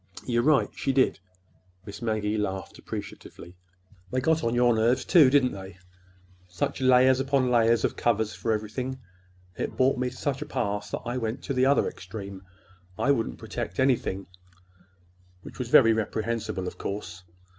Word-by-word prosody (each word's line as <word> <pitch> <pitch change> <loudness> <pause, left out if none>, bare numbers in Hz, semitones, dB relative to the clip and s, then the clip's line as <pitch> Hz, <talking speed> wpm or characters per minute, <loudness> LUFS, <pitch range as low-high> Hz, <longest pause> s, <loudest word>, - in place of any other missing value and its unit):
"You're 120 -1 +1
right 150 +2 +3
she 135 - -1
did!" 130 -6 +2 0.7
Miss 100 +2 -9
Maggie 110 -2 -1
laughed 95 -3 -4
appreciatively. 90 +2 -9 0.5
"They 130 - -1
got 160 +4 +1
on 115 +1 0
your 120 0 +4
nerves, 115 +3 +2
too, 160 -7 +6
didn't 130 -2 +3
they? 95 -2 -9 0.7
Such 90 +8 -3
layers 130 0 +5
upon 135 -2 +1
layers 115 -1 +3
of - - -2
covers 110 -2 0
for 115 - -2
everything! 110 +5 -3 0.6
It - - -4
brought 130 0 +3
me 125 0 0
to 125 - -13
such 135 0 -2
a - - -5
pass 105 0 -2
that - - -5
I 120 +1 -2
went 115 0 -4
to 140 - -3
the 130 0 +3
other 140 - +3
extreme. 100 -3 -8 0.6
I 140 - +2
wouldn't 115 -5 -1
protect 90 - -6
anything—which 90 -5 -5
was 125 -2 -3
very 115 -1 +7
reprehensible, 110 -2 -2
of - - -7
course. 90 -3 -6
115 Hz, 160 wpm, -26 LUFS, 100-130 Hz, 0.7 s, very